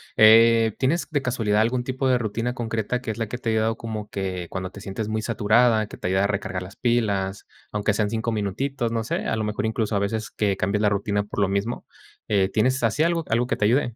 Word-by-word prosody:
eh, 115 0 +6
¿tienes 155 +7 0
de 145 -3 +1
casualidad 115 -5 0
algún 120 +2 +1
tipo 130 +1 -2
de 125 -1 +4
rutina 115 +2 -2
concreta 115 0 -2
que 110 - -3
es 110 - -7
la 115 -2 -2
que 120 - -5
te 120 -2 -3
ha - - +2
ayudado 110 +1 +1
como 110 -2 -6
que 95 -3 -4
cuando 95 -1 -4
te 100 - -11
sientes 105 +2 -4
muy 110 0 -1
saturada, 110 0 +3
que - - -10
te - - -4
ayude 95 +1 +2
a 100 - +3
recargar 100 -2 -3
las 95 - -12
pilas?, 100 -5 0 0.3
aunque 105 0 +1
sean 105 -1 0
5 115 +1 -2
minutitos, 115 +4 -2
no 115 -1 -1
sé, - - -3
a - - 0
lo 110 - -2
mejor 105 +1 -2
incluso 110 -1 -1
a - - +1
veces 110 +2 -2
que 100 -2 0
cambias 100 +3 0
la 105 - +4
rutina 100 0 0
por 105 0 -6
lo 95 - +2
mismo, 100 +5 -2 0.4
eh, 100 -2 +3
¿tienes 130 +6 +1
así 115 +7 +2
algo 165 -1 +1
algo 120 +2 +1
que - - -1
te 105 - +1
ayude? 120 0 +2
110 Hz, 245 wpm, -24 LUFS, 100-120 Hz, 0.4 s, eh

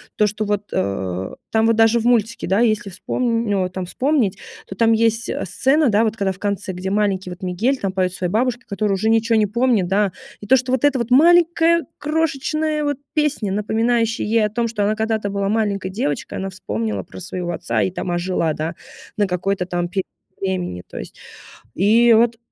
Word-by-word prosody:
То, 210 - +3
что 210 +1 -2
вот, 205 0 -2
э, 95 -1 -2 0.2
там 220 0 +3
вот 230 0 +3
даже 225 +1 +4
в 225 - -4
мультике 230 -4 +1
да, 195 +5 +2
если 215 -3 +1
вспомн 230 +4 -1
ну, 200 -1 +1
вот 185 0 -4
там 185 -1 -4
вспомнить, 255 -4 0 0.3
то 195 - -8
там 225 +2 +3
есть, 225 0 +1
э, - - -3
сцена, 270 - +2
да 215 +1 +3
вот, 220 - -1
когда 200 -3 0
в 185 - -10
конце, 200 -2 -2
где 185 +1 -4
маленький 200 -3 0
вот 180 0 -9
Мигель 215 +10 0
там 195 -6 -2
поет 185 -1 0
своей 180 -1 -3
бабушке, 245 +3 0
которая 200 0 -1
уже 220 +3 0
ничего 225 0 +1
не 215 -1 +3
помнит, 235 -4 +1
да. 195 0 +1 0.3
И 205 - -8
то, 265 - +6
что 255 0 -1
вот 260 0 0
эта 275 -3 +3
вот 235 +1 -2
маленькая 335 +3 +5
крошечная 305 0 -1
вот 290 -2 -1 0.2
песня, 295 -9 0
напоминающая 225 +3 0
ей 220 0 +2
о - - -1
том, 235 +2 -1
что 220 -3 -2
она 215 +1 +1
когда-то 220 -2 -1
была 200 0 -1
маленькой 205 -3 0
девочкой, 185 - -3
она 195 0 -3
вспомнила 110 - -3
про 95 - -12
своего 175 - -4
отца 115 -9 -1
и 95 - +1
там 180 - -4
ожила, 175 -2 0
да, 160 +3 -4 0.4
на 205 - +3
какой-то 180 +1 -1
там 175 -1 -2
период 190 0 -2 0.3
времени 180 - -3
то - - -8
есть. - - -9 0.6
И 230 +5 +5
вот 230 +1 +3
210 Hz, 210 wpm, -20 LUFS, 185-235 Hz, 0.6 s, то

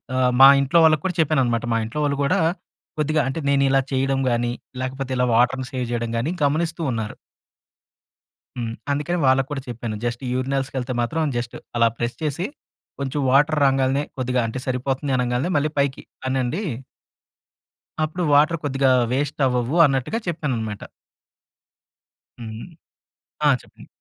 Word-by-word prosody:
ఆహ్, 125 -1 +3
మా 135 - +12
ఇంట్లో 140 +5 +3
వాళ్ళకి 155 -2 +4
కూడా 180 - -1
చెప్పాననమాట. 130 -7 +1
మా - - +2
ఇంట్లో 125 +7 -5
వాళ్ళు 140 -1 0
కూడా, 140 - +2 0.6
కొద్దిగా 155 +1 +2
అంటే, 135 - -3
నేనిలా 135 -1 +3
చేయడం 135 0 +1
గాని 120 0 0 0.3
లేకపోతే 130 0 -4
ఇలా 125 - +2
వాటర్‌ని, 125 +2 +2
సేవ్ 125 -1 -2
చేయడం 120 -1 -2
గాని, 135 +9 -1
గమనిస్తూ 160 +4 0
ఉన్నారు. 110 -2 -4 1.4
హ్మ్. 115 -2 -3 0.2
అందుకని 150 +5 -1
వాళ్ళకూడా 135 +1 +1
చెప్పాను. 115 -2 -4
జస్ట్, 120 +2 -3
యూరినల్స్‌కి 135 +1 -2
ఏళ్తే 125 +1 -3
మాత్రం 150 +5 -1
జస్ట్ 120 0 -4 0.2
అలా 115 0 +5
ప్రెస్ 120 +1 -2
చేసి 150 +4 -1 0.5
కొంచెం 140 +1 -2
వాటర్ 150 +2 +4
రాంగాల్నే, 135 +1 +2
కొద్దిగా 125 -1 0
అంటే, 110 - -5
సరిపోతుంది 135 +2 -1
అనంగాల్నే 125 +6 0
మళ్ళీ 150 +2 +1
పైకి 140 -1 0 0.3
అనండి..." 130 - -1 1.4
"అప్పుడు 175 +3 -2
వాటర్ 155 +4 +4
కొద్దిగా 135 -2 +2 0.2
వేస్ట్ 145 +2 -1
అవ్వవు" 125 +3 -1
అన్నట్టుగా 135 - 0
చెప్పానన్నమాట. 120 -11 -3 1.6
హ్మ్. 110 +4 -7 0.8
ఆ! 145 - +6
చెప్పండి. - - -17
135 Hz, 135 wpm, -22 LUFS, 125-145 Hz, 1.6 s, మా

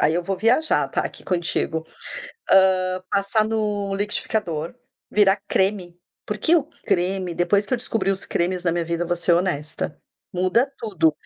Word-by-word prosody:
aí 155 +2 +3
eu 175 - 0
vou 190 +2 -2
viajar, 240 +10 +2
tá, - - 0
aqui - - -7
contigo. 165 -2 -1 1.0
Hã, 185 0 -2
passar 200 +2 +2
no 210 -3 -1
liquidificador, 195 -4 -2 0.4
virar 205 -1 +4
creme, 190 -3 0 0.3
porque 335 - +2
o 330 - +4 0.2
creme, 180 0 0
depois 200 +4 +2
que - - -7
eu - - +2
descobri 225 -5 -1
os 195 - -2
cremes 180 +1 0
na 175 - +2
minha 170 0 -1
vida, 170 +1 -1
vou 175 0 -1
ser 170 +1 +1
honesta, 170 -4 -1 0.3
muda 185 +9 +2
tudo. 170 -8 +1
185 Hz, 160 wpm, -23 LUFS, 175-210 Hz, 1.0 s, virar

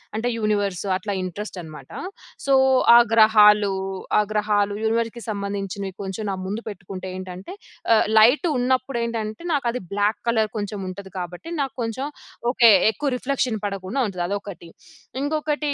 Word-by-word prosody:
అంటే 225 +3 -1
యూనివర్స్ 205 -5 0
అట్లా 205 +1 -4
ఇంట్రెస్ట్ 190 +3 -6
అన్నమాట. 155 -2 -11 0.5
సో, 275 - +3 0.4
ఆ - - +10 0.2
గ్రహాలు, 210 -2 +6 0.5
ఆ - - +6
గ్రహాలు 210 -1 +1
యూనివర్స్‌కి 230 +1 -1
సంబంధించినవి 200 -1 -4
కొంచెం 195 +2 -5
నా - - -2
ముందు 205 +4 -3
పెట్టుకుంటేంటంటే 185 - -7 0.4
ఆ - - +7 0.2
లైట్ 245 +11 +6
ఉన్నప్పుడేంటంటే 240 -2 -1
నాకు 275 -4 0
అది 250 - -4
బ్లాక్ 205 +1 +1
కలర్ 220 -2 +2
కొంచెం 205 0 -4
ఉంటది 190 +1 -9
కాబట్టి, 175 - -7
నాకు 270 -1 -3
కొంచెం 230 +5 -3 0.4
ఓకే 235 -3 +6 0.2
ఎక్కువ 285 +4 -2
రిఫ్లెక్షన్ 250 -4 -1
పడకుండా 195 +5 -3
ఉంటది 180 -3 -3
అదొకటి. 200 -4 -6 0.5
ఇంకొకటి 300 0 -1
210 Hz, 135 wpm, -23 LUFS, 195-235 Hz, 0.5 s, ఆ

